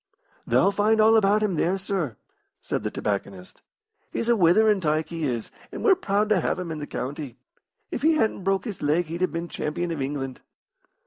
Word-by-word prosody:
"Thou'll 195 - +4
find 215 +2 +2
all 220 +1 +6
about 210 0 +4
him 195 -6 0
there, 180 +5 +1
sir," 190 - -3 0.4
said - - -3
the - - -2
tobacconist. 100 -2 -4 0.5
"He's 230 - -2
a 235 - +5
witherin' 205 +2 +4
tyke, 155 -1 0
he 165 -2 -3
is, 120 -5 -3 0.2
and - - -6
we're 410 - +6
proud 210 - 0
to 200 -5 +3
have - - 0
him 180 -3 -5
in 155 - -4
the 145 - -6
county. 140 -1 -5 0.5
If - - -3
he 320 +2 +4
hadn't 220 -10 0
broke 195 +3 0
his 215 -5 -6
leg 155 +4 +2
he'd 165 +3 -6
have 185 - +1
been 170 +1 -4
champion 170 +2 -3
of 160 -4 -3
England." 135 -1 -4
175 Hz, 200 wpm, -25 LUFS, 150-210 Hz, 0.5 s, all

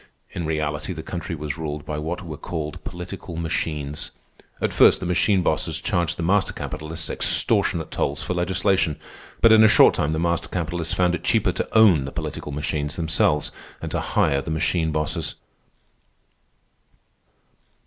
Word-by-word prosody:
In 85 -3 -4
reality, 75 +2 -2
the 80 -2 -7
country 85 0 -5
was 75 0 -5
ruled 75 -2 -4
by 75 0 -4
what 85 +4 -4
were 80 -3 -6
called 75 0 -5
political 90 0 -7
machines. 75 -3 -3 0.5
At - - -1
first - - +6
the - - -5
machine 90 +2 +2
bosses - - 0
charged 85 -3 -1
the 85 - -3
master 95 +3 +2
capitalists 80 +1 -5
extortionate - - +2
tolls - - -2
for - - -2
legislation; 90 -2 +1 0.4
but 115 - +7
in 110 0 +8
a - - +8
short - - +6
time 75 - 0
the 80 - -1
master 85 0 0
capitalists 85 -1 -2
found 90 -1 +2
it 90 - -3
cheaper 105 -5 +2
to 90 - -2
own 95 -11 +6
the 70 - -6
political 75 - -5
machines 75 0 -3
themselves 80 -2 +1 0.3
and - - -6
to - - -1
hire 70 0 +1
the - - -7
machine 80 0 0
bosses. 75 0 -2
80 Hz, 160 wpm, -23 LUFS, 75-90 Hz, 0.5 s, in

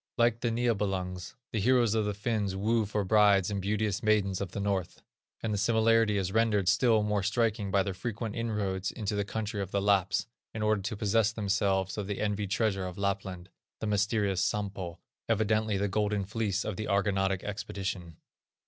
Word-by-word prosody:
Like 120 -1 +3
the 120 - 0
Niebelungs, 100 -6 -1 0.2
the 110 - -1
heroes 120 0 +3
of 110 -2 +1
the 105 -1 -2
Finns 105 -2 -1
woo 110 +2 +1
for 105 0 -1
brides 100 -1 +4
the - - -3
beauteous 105 +1 -1
maidens 100 -3 +2
of 100 - -3
the 100 - -5
North; 100 -3 -2 0.4
and 110 -2 -1
the 100 - -1
similarity 110 0 +3
is 95 -1 -1
rendered 110 -3 +2
still 110 +3 +4
more 105 -1 0
striking 105 0 0
by 95 0 +3
their 95 - -3
frequent 110 +2 -4
inroads 100 -5 -2
into 105 -3 -3
the 100 - 0
country 105 0 -3
of 95 - -4
the 100 - 0
Lapps, 100 -2 +2 0.3
in 110 - -2
order 105 -1 +2
to 100 +2 -4
possess 110 +1 +2
themselves 100 -2 0
of 100 - -4
the 100 -1 -3
envied 105 -1 -1
treasure 95 -2 0
of 90 - -8
Lapland, 95 -2 -3 0.3
the - - -3
mysterious 100 -2 +1
Sampo, 95 -4 -2 0.3
evidently 110 -1 +1
the 100 +1 0
Golden 105 0 0
Fleece 105 -1 -1
of 105 -4 -3
the 110 - -3
Argonautic 95 -2 +1
expedition. 95 -4 -5
105 Hz, 185 wpm, -30 LUFS, 95-110 Hz, 0.4 s, brides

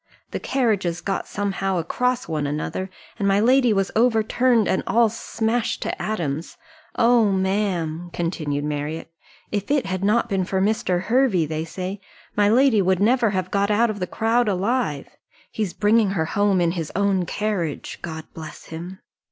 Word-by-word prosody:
The - - -3
carriages 205 -10 0
got 195 +3 -3
somehow 195 -2 -1
across 250 +9 -1
one 155 -3 -1
another, 155 +6 -3 0.3
and 200 - +1
my 195 0 +3
lady 250 +2 +4
was 195 -2 +1
overturned, 230 0 +3
and 190 - +1
all 230 -1 +4
smashed 230 +1 -2
to - - -4
atoms. 165 -7 -3 0.4
Oh, 230 -3 +4
ma'am," 190 -4 -1
continued 155 -5 -2
Marriott, 150 +2 -4 0.4
"if 205 -2 -2
it 285 -3 +2
had 190 0 -3
not 220 +4 +2
been 195 -4 0
for 190 +1 -1
Mr. 190 -3 +1
Hervey, 225 -6 +2
they 155 +1 -3
say, 185 +4 -5 0.3
my 205 0 +4
lady 240 -2 +4
would 185 -1 +2
never 230 +2 +3
have 185 -2 -2
been 200 - +1
got 200 - +1
out 220 +2 +3
of 205 - -7
the 180 - -2
crowd 230 +4 +1
alive. 195 - -1 0.4
He's 210 -5 -2
bringing 210 +2 +3
her 160 - +1
home 200 +2 +2
in 170 -1 +2
his 165 -3 -4
own 195 -2 +1
carriage, 190 -8 -3
God 160 -2 -6
bless 160 -1 -9
him!" 175 +4 -8
195 Hz, 170 wpm, -23 LUFS, 175-225 Hz, 0.4 s, lady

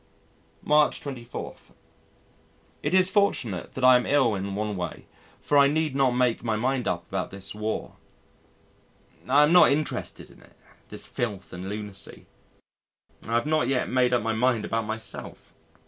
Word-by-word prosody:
March 150 0 +3
24. 125 -4 -7 1.3
It - - 0
is 185 0 +4
fortunate 125 - 0
I 130 0 +6
am 125 - +1
ill 135 -6 +3
in 100 0 -4
one 105 0 -2
way 90 -3 -5 0.3
for 145 - +2
I 140 - +7
need 150 -1 0
not 135 -3 +2
make 125 -2 +1
my 115 -2 0
mind 125 +2 -1
up 85 -1 -2
about 95 -1 -3
this 95 0 -9
War. 105 +1 -4 1.3
I 145 +3 +6
am 150 +3 +3
not 180 -5 +7
interested 150 +2 -3
in - - -19
it - - -22 0.3
this - - -6
filth 105 -5 -4
and 90 +2 -6
lunacy. 105 -2 -8 1.0
I 115 - -1
have 120 - +1
not 155 0 +1
yet 135 -2 0
made 125 -1 +2
up 120 -3 +1
my 115 0 0
mind 115 -1 +1
about 115 0 -2
myself. 110 +1 -8
120 Hz, 160 wpm, -26 LUFS, 105-140 Hz, 1.3 s, I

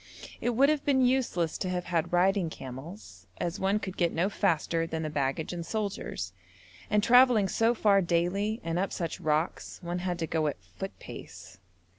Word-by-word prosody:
It 245 -1 0
would 275 +4 +5
have 305 -2 +1
been 265 -3 +3
useless 240 -11 +1
to 185 - -2
have 180 -1 -1
had 165 -3 -1
riding 180 0 +3
camels, 145 - -9
as 175 +3 -2
one 195 +2 +2
could 190 -3 -5
get 170 -2 +2
no 175 +4 +1
faster 165 -2 +1
than 160 0 -3
the 155 - -3
baggage 145 +3 -1
and 170 -1 -4
soldiers, 195 - -3 0.6
and 210 -1 +2
travelling 245 -4 +6
so 230 +5 +2
far 200 -3 +4
daily, 185 +6 0
and 165 +1 -1
up 195 0 -1
such 170 -2 -3
rocks, 155 +2 -1
one 175 +1 -2
had 180 -1 -2
to 165 - -1
go 160 -1 0
at 145 - -2
foot 195 0 -8
pace. 90 -1 -11
180 Hz, 185 wpm, -29 LUFS, 165-210 Hz, 0.6 s, travelling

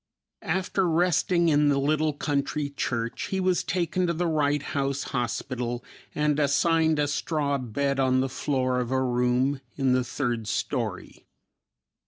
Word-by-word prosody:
After 185 +1 0
resting 170 +1 +2
in 145 -1 +4
the 140 - +2
little 155 +2 +1
country 145 0 -2
church 115 -4 -2
he 190 - -2
was 185 -1 +1
taken 180 0 0
to 170 - +1
the 175 +2 -1
Wright 145 -3 +1
House 140 -1 -1
Hospital 120 0 -2 0.3
and 150 0 +1
assigned 160 +2 +3
a 145 -1 +1
straw 145 -1 -1
bed 135 +3 -1
on 130 -1 +3
the 130 - +1
floor 130 -1 -1
of 125 -2 -2
a 130 0 +1
room 125 +2 +1 0.2
in 135 -2 +2
the 130 0 +2
third 120 -3 -2
story. - - -3
140 Hz, 150 wpm, -26 LUFS, 130-155 Hz, 0.3 s, in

